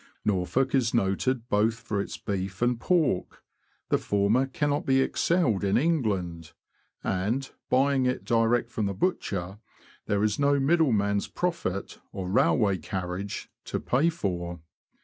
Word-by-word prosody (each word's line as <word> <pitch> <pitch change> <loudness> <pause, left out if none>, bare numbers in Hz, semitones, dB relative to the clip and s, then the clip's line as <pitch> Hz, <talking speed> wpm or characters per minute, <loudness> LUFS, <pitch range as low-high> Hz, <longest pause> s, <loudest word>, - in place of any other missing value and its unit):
Norfolk 105 +7 +1
is 125 -4 +2
noted 115 +4 0
both 110 +1 +2
for 105 -3 -3
its - - -6
beef 95 +1 -3
and 120 -1 +2
pork; 155 - 0 0.5
the - - +2
former 105 +6 +2
cannot 145 +2 -1
be 135 0 +3
excelled 135 - +1
in 100 +2 +2
England, 100 - -1 0.5
and, 105 +9 -1 0.2
buying 135 0 +3
it 125 - -2
direct 115 0 +2
from 105 -2 -1
the 100 - -3
butcher, 95 - -2 0.5
there 100 0 +1
is 105 +2 +1
no 140 0 +3
middleman's 125 -10 +2
profit 165 - -3
or 95 -2 -5
railway 110 - +3
carriage 95 +3 -5
to - - -3
pay 140 +7 +2
for. 90 - -3
110 Hz, 135 wpm, -27 LUFS, 100-135 Hz, 0.5 s, be